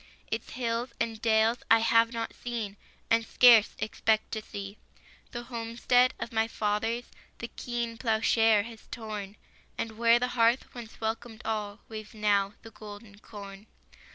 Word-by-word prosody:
Its 225 0 -3
hills 235 0 -2
and 225 -1 -2
dales 225 +1 +3
I 225 - +8
have 230 0 +4
not 230 -2 -4
seen, 230 -5 -5 0.4
And 230 0 +4
scarce 230 -2 +6
expect 220 0 0
to 220 - -3
see. 200 -1 -8 0.5
The 240 -1 -6
homestead 240 +1 +1
of 235 - -5
my 220 0 +1
fathers 225 +2 -2 0.3
The 235 - -6
keen 235 -2 -4
ploughshare 225 -2 +3
has 225 0 -11
torn, 210 -3 -6 0.4
And 225 -1 -4
where 235 0 +6
the 250 +1 -1
hearth 235 +1 +2
once 235 -2 -10
welcomed 225 +1 -4
all 210 -1 -3
Waves 215 0 -8
now 205 -2 +2
the 225 - -11
golden 205 -1 -11
corn. 200 -1 -11
225 Hz, 150 wpm, -29 LUFS, 215-235 Hz, 0.5 s, I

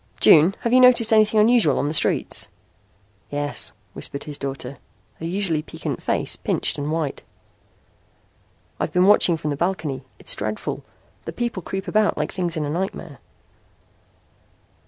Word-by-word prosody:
June, 165 +5 +6
have 235 - -1
you 255 - +7
noticed 245 -3 +5
anything 215 0 +4
unusual 215 - +4
on 145 - 0
the 150 - -2
streets?" 155 - +2 0.8
"Yes," 145 -8 -2 0.2
whispered 140 - -6
his 150 -2 -6
daughter, 135 -1 -5 0.4
her 165 - -6
usually 175 -4 -1
piquant - - -6
face - - 0
pinched - - -1
and 145 +1 -3
white. 160 -3 -2 1.6
"I've - - -2
been 180 +1 +3
watching 190 -4 +5
from 150 -1 -3
the - - -2
balcony. 160 -6 -2
It's - - 0
dreadful. 105 +1 -4 0.4
The - - -6
people 240 -6 -3
creep 195 +3 -5
about 210 +3 +1
like - - -2
things 175 -3 -2
in 155 - -1
a - - -4
nightmare." 170 -5 -5
165 Hz, 150 wpm, -22 LUFS, 145-205 Hz, 1.6 s, you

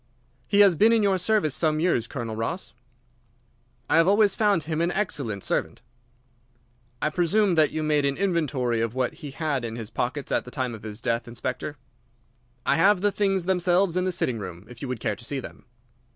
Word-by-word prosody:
"He 205 0 +4
has 200 -3 +7
been 215 +8 +4
in 225 -2 +3
your 195 -2 +2
service 180 -6 +1
some 155 -1 +1
years, 155 -9 +1
Colonel 115 -4 -5
Ross?" 160 +12 -4 1.1
"I - - +3
have 165 +1 +5
always 205 0 +4
found 205 -7 +2
him 160 +1 -2
an 170 - +2
excellent 135 - -2
servant." - - -2 1.2
"I 150 - +1
presume 185 +4 +2
that 155 -3 +4
you 155 - -2
made 150 -1 +2
an 140 0 0
inventory 145 - 0
of 115 +1 -2
what 130 -2 0
he 145 - -6
had 140 -2 -2
in 115 -1 -4
his 115 -3 -7
pockets 130 +3 -3
at - - +1
the - - -10
time 130 -2 -3
of 110 - -9
his 110 +1 -8
death, 120 -1 -1
Inspector?" 130 +5 -5 0.9
"I - - +3
have 195 +2 +4
the 205 0 +2
things 195 -3 0
themselves 180 0 +2
in 180 0 +1
the 185 - 0
sitting 130 -10 -1
room, 90 -1 -8
if 120 0 -13
you 140 - -4
would 125 -2 -4
care - - -1
to 120 - -13
see 135 +3 -3
them." - - -10
155 Hz, 205 wpm, -25 LUFS, 125-185 Hz, 1.2 s, has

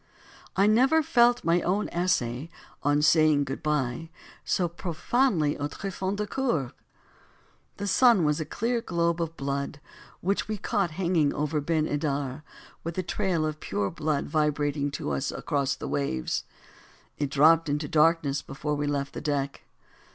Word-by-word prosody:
I 195 - +4
never 260 +9 +4
felt 245 -5 +4
my 170 +1 +3
own 195 +5 0
essay 155 -6 -1 0.3
"On 145 +1 +2
saying 155 -2 +5
Good 135 -1 -5
Bye" 150 -1 -1 0.3
so 180 - +1
profoundly 170 - 0
aux 145 - -1
tréfonds 190 +3 -4
du 210 +1 -2
coeur. 200 - -1 1.1
The 205 - -4
sun 230 -2 +5
was 150 +1 +1
a - - -1
clear 235 +6 -1
globe 170 -3 0
of 165 0 -4
blood 140 +1 -3 0.4
which 200 +3 -1
we 215 0 -2
caught 195 -1 0
hanging 170 -6 +1
over 150 +1 -1
Ben 155 +1 +1
Edar, 145 -2 -2 0.4
with 165 +1 -5
a 185 - 0
trail 180 -3 0
of 155 0 -3
pure 100 -1 -2
blood 150 -2 -1
vibrating 145 -1 0
to 140 - -4
us 70 -1 -1
across 140 -1 -1
the - - -6
waves. 65 - -2 0.7
It 145 -2 0
dropped 155 +3 +5
into 145 +1 -1
darkness 155 -2 +2
before 150 +2 -4
we 145 0 -1
left 140 -1 -2
the - - -6
deck. 140 -2 -2
155 Hz, 155 wpm, -27 LUFS, 145-185 Hz, 1.1 s, saying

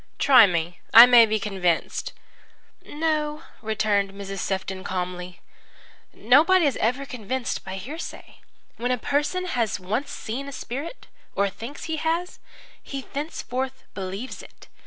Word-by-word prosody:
Try 255 -6 +7
me; 170 -1 -2 0.2
I 230 +1 +13
may 240 -2 +7
be 215 0 0
convinced." 190 -5 -1 0.7
"No," 300 -1 -2 0.2
returned 210 -2 0
Mrs. 195 0 -6
Sefton 190 0 -3
calmly. 180 0 -5 0.7
"Nobody 315 +9 +4
ever 260 -1 0
is - - -11
convinced 250 +1 -3
by 190 0 -6
hearsay. 270 - -8 0.4
When 245 +2 -2
a 250 - +1
person 295 +9 -1
has 235 - -1
once 215 +10 -2
seen 255 +5 -5
a - - -6
spirit 280 - -6 0.3
or 200 0 +1
thinks 240 +9 -8
he 320 0 -3
has 330 +3 -2 0.4
he 275 -1 -6
thenceforth 265 -3 -4
believes 195 +6 -6
it. - - -16
240 Hz, 135 wpm, -24 LUFS, 195-285 Hz, 0.7 s, I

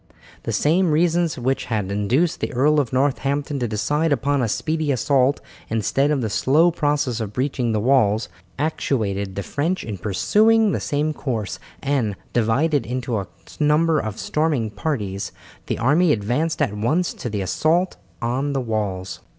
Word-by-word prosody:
The - - -3
same 170 +4 +2
reasons 170 +1 +2
which 130 +2 -1
had 105 -5 -2
induced 120 - +1
the - - -2
Earl 150 +5 +3
of 135 -5 -1
Northampton 140 +2 0
to 120 - -1
decide 145 +9 0
upon 140 0 +1
a 120 - +1
speedy 155 +6 -1
assault 135 +1 +2 0.3
instead 115 +6 +1
of 145 -3 +1
the 115 - -1
slow 155 - +3
process 145 -6 0
of 105 -2 -4
breaching 130 -2 -1
the 110 - +1
walls, 110 -3 +3 0.3
actuated 105 -10 -1
the 100 - -3
French 165 - -1
in 105 -4 -6
pursuing 215 - +3
the - - -1
same 150 +2 -1
course, 115 -9 -3 0.2
and, 130 -8 0 0.2
divided 125 +5 +2
into 125 -2 -2
a 95 - -5 0.3
number 155 +1 +3
of 110 -4 -4
storming 150 -8 0
parties, 105 -5 -3 0.4
the - - -1
army 150 +8 +3
advanced 130 +9 0
at 105 - -1
once 145 +13 0
to 120 - -5
the 105 -2 -2
assault 165 - +1 0.3
on 130 +4 -1
the 135 - 0
walls. 105 -5 -3
135 Hz, 160 wpm, -22 LUFS, 110-150 Hz, 0.4 s, Earl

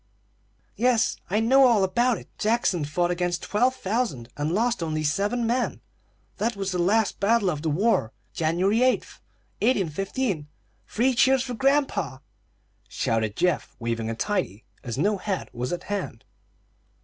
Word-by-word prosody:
"Yes, 240 -2 +2
I 205 +4 +1
know 260 +4 +5
all 225 -5 +4
about 235 +5 +2
it. - - -12
Jackson 210 -7 +1
fought 175 +4 0
against 175 -1 -1
twelve 245 +6 +1
thousand, 195 - -2
and 145 +2 -2
lost 230 +3 +1
only 155 -1 -2
seven 205 +10 0
men. 245 +2 0 0.6
That 225 +3 -1
was 195 -1 -3
the 180 - -2
last 205 +5 +2
battle 205 -2 +3
of 150 -3 -4
the 160 - -1
war, 160 - +1 0.2
January 180 +8 +1
8, 255 - +6 0.7
1815. 195 - 0 0.4
Three 255 +4 +1
cheers 260 +1 +4
for 250 -1 -5
grandpa!" 265 - +1 0.7
shouted 110 -2 -1
Geoff, 180 -2 0
waving 115 -1 -3
a 115 - -3
tidy, 175 - -2 0.2
as 120 0 -5
no 205 +8 +1
hat 195 -1 -4
was 125 +1 -3
at 175 - -3
hand. 200 - -5
195 Hz, 150 wpm, -25 LUFS, 155-235 Hz, 0.7 s, 8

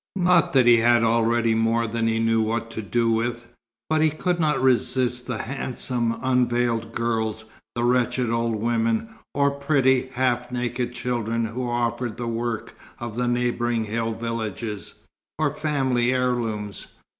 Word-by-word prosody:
Not 180 -3 +3
that 130 -3 +5
he 120 -1 +7
had 120 0 +4
not 115 - +3
already 115 0 +2
more 115 +1 +2
than 115 0 -1
he 115 0 +1
knew 115 0 +2
what 115 +1 -2
to 110 - -4
do 115 +2 +1
with; 120 +1 -1 0.4
but 155 0 +2
he 155 - +4
could 175 +3 -1
not 150 -4 +2
resist 125 -1 +2
the 125 -3 -2
handsome 120 -2 -2
unveiled 120 -3 +1
girls, 110 -2 -2 0.3
the 120 - -1
wretched 125 0 +1
old 115 -1 0
women, 115 - 0 0.3
or 140 0 +3
pretty, 135 -2 +2
half 125 -1 0
naked 125 0 -2
children 115 -2 -1
who 120 +2 -3
offered 120 -1 -1
the 120 - -4
work 115 -1 -3 0.2
of 120 -2 -6
the 125 0 0
neighbouring 120 -1 0
hill 115 +1 -2
villages, 115 -2 -4 0.4
or 150 -2 0
family 135 -6 +1
heirlooms. 115 -5 -2
120 Hz, 155 wpm, -24 LUFS, 115-125 Hz, 0.4 s, he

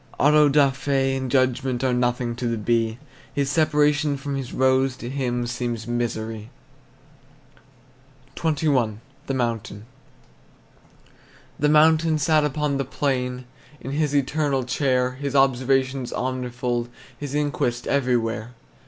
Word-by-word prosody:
Auto 150 +1 +5
da 140 -1 +4
fe 135 0 0
and 130 -1 -3
judgment 130 -1 +1
Are 130 -1 +2
nothing 120 -1 0
to 125 - -2
the 115 -1 -1
bee; 115 +1 0 0.4
His 140 -1 0
separation 150 -2 +2
from 140 0 -4
his 135 -2 -5
rose 130 0 +2
To 120 - -6
him 125 -3 -1
seems 120 -2 -3
misery. 115 -2 -3 1.9
XXI. 145 -9 +1 0.3
THE 135 - -1
MOUNTAIN. 115 -4 -3 1.7
The 150 - +3
mountain 155 +1 +4
sat 155 +1 +3
upon 150 -1 -1
the 135 - 0
plain 125 -2 -2 0.3
In 135 - -6
his 145 0 0
eternal 140 -1 +1
chair, 125 -1 +1
His 140 +2 -5
observation 135 0 +2
omnifold, 125 -1 -3 0.3
His 145 -1 -5
inquest 140 -5 -1
everywhere. 120 -4 0
130 Hz, 120 wpm, -23 LUFS, 120-145 Hz, 1.9 s, Auto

